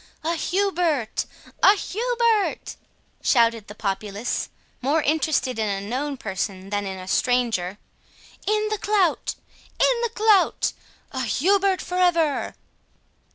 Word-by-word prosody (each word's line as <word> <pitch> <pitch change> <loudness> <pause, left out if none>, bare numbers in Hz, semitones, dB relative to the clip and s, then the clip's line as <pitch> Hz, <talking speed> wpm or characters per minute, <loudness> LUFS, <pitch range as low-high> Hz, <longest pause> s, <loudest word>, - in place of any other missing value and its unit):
"A 330 +2 0
Hubert! 345 - 0 0.3
a 400 - +7
Hubert!" 465 +1 0 0.5
shouted 230 -4 +3
the 210 - -10
populace, 205 +2 -3 0.3
more 290 +4 +1
interested 295 -5 +1
in 215 -1 0
a 195 -1 -1
known 275 +4 -2
person 195 -2 -4
than 205 -1 -1
in 190 0 -5
a 185 0 -9
stranger. 225 -5 +1 0.7
"In 425 0 +1
the 430 -1 -2
clout!—in 420 +5 0
the 470 - 0
clout!—a 410 -9 +1
Hubert 385 - +2
for 360 +1 -3
ever!" 335 -5 +2
295 Hz, 110 wpm, -24 LUFS, -, 0.7 s, a